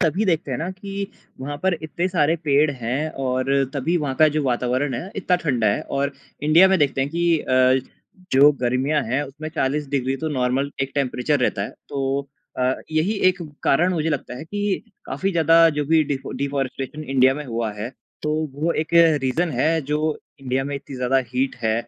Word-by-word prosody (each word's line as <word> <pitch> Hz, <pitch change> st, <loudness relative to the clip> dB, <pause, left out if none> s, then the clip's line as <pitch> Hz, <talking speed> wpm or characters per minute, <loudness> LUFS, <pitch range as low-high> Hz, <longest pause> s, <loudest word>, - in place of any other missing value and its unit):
तभी 175 Hz, +6 st, +1 dB
देखते 165 Hz, -6 st, 0 dB
हैं 130 Hz, -, -2 dB
ना 170 Hz, +4 st, -3 dB
कि 195 Hz, +1 st, -5 dB, 0.3 s
वहाँ 145 Hz, +2 st, -4 dB
पर 190 Hz, -1 st, +2 dB
इतने 170 Hz, +4 st, -2 dB
सारे 165 Hz, -2 st, +2 dB
पेड़ 145 Hz, +1 st, +3 dB
हैं 130 Hz, +4 st, -2 dB, 0.2 s
और 130 Hz, 0 st, 0 dB, 0.3 s
तभी 160 Hz, +6 st, 0 dB
वहाँ 145 Hz, -5 st, -1 dB
का 155 Hz, -1 st, +6 dB
जो 150 Hz, -, +1 dB
वातावरण 125 Hz, +2 st, 0 dB
है, 175 Hz, +11 st, -5 dB
इतना 180 Hz, -2 st, +2 dB
ठंडा 130 Hz, -10 st, 0 dB
है 100 Hz, -, +2 dB
और 140 Hz, +1 st, -2 dB, 0.3 s
इंडिया 165 Hz, +5 st, +6 dB
में 190 Hz, -1 st, +3 dB
देखते 140 Hz, -2 st, +1 dB
हैं 135 Hz, +2 st, 0 dB
कि 170 Hz, -1 st, +2 dB
अ, 130 Hz, -1 st, +3 dB, 0.5 s
जो 140 Hz, +3 st, +7 dB
गर्मियाँ 130 Hz, +5 st, +1 dB
हैं, 130 Hz, +6 st, 0 dB
उसमें 150 Hz, +3 st, -7 dB
40 150 Hz, -1 st, -1 dB
डिग्री 135 Hz, -1 st, 0 dB
तो 160 Hz, +2 st, -3 dB
नॉर्मल 135 Hz, 0 st, 0 dB
एक 135 Hz, -, -3 dB
टेंपरेचर 140 Hz, +1 st, 0 dB
रहता 100 Hz, -5 st, +1 dB
है। -, -, -4 dB, 0.2 s
तो 140 Hz, 0 st, -2 dB, 0.3 s
अ, 130 Hz, +1 st, +2 dB, 0.2 s
यही 155 Hz, +7 st, +1 dB, 0.2 s
एक 180 Hz, -1 st, -1 dB, 0.2 s
कारण 175 Hz, +7 st, +3 dB
मुझे 160 Hz, 0 st, 0 dB
लगता 140 Hz, -4 st, -3 dB
है 155 Hz, -, -7 dB
कि 205 Hz, +2 st, -2 dB, 0.2 s
काफ़ी 145 Hz, +9 st, -1 dB
ज़्यादा 165 Hz, 0 st, +5 dB
जो 145 Hz, -, +1 dB
भी 160 Hz, 0 st, +4 dB
डीफ़ॉ 135 Hz, -1 st, -4 dB
डीफ़ॉरेस्टेशन 140 Hz, +1 st, -3 dB
इंडिया 130 Hz, -1 st, +4 dB
में 150 Hz, 0 st, -5 dB
हुआ 115 Hz, -3 st, -3 dB
है, 105 Hz, +4 st, -5 dB, 0.3 s
तो 150 Hz, 0 st, 0 dB, 0.2 s
वो 160 Hz, +4 st, 0 dB
एक 155 Hz, -, -2 dB, 0.3 s
रीज़न 160 Hz, +7 st, 0 dB
है, 160 Hz, +5 st, +1 dB
जो 150 Hz, +2 st, -1 dB, 0.2 s
इंडिया 130 Hz, 0 st, -1 dB
में 145 Hz, +1 st, -4 dB
इतनी 140 Hz, -1 st, -9 dB
ज़्यादा 125 Hz, +1 st, +2 dB
हीट 130 Hz, +1 st, 0 dB
है 110 Hz, 0 st, +2 dB
145 Hz, 195 wpm, -22 LUFS, 130-160 Hz, 0.5 s, जो